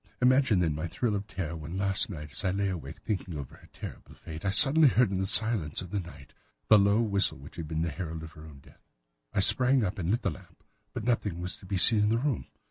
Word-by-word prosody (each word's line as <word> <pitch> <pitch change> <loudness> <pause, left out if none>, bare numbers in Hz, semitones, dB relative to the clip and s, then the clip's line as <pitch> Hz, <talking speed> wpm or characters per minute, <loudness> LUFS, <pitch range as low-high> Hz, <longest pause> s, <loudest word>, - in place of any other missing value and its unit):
Imagine, 130 -3 +4
then, 80 -3 +1
my 80 +3 -3
thrill 110 +6 -1
of 100 +1 -4
terror 85 -5 -4
when 80 +3 -6
last 95 +1 +1
night, 75 -6 -7
as 70 - -4
I 95 - +1
lay 100 +1 0
awake, 80 -8 -6
thinking 90 -6 -3
over 70 -3 -8
her - - -19
terrible - - -10
fate, 80 -1 -9
I 100 - +1
suddenly 145 +9 +5
heard 125 -5 +3
in 95 - -1
the 95 - -1
silence 110 -8 +2
of 90 -1 -7
the 105 - -1
night 85 -7 -11 0.4
the 110 - +8
low 100 +3 +3
whistle 100 - 0
which 70 +2 -13
had 80 -2 -5
been 80 +1 -2
the 85 - -2
herald 80 +1 -6
of 80 - -9
her 80 -2 -13
own 70 -3 -14
death. - - -21 0.5
I - - +1
sprang 125 +5 +3
up 100 +1 -3
and 85 -2 -2
lit 115 +4 0
the - - 0
lamp, - - -14 0.3
but - - -4
nothing 105 -7 -1
was 90 +1 -5
to 95 - -14
be 95 0 -1
seen 110 +4 +6
in 105 0 +3
the 115 - +2
room. 135 +1 -2
95 Hz, 260 wpm, -29 LUFS, 80-110 Hz, 0.5 s, the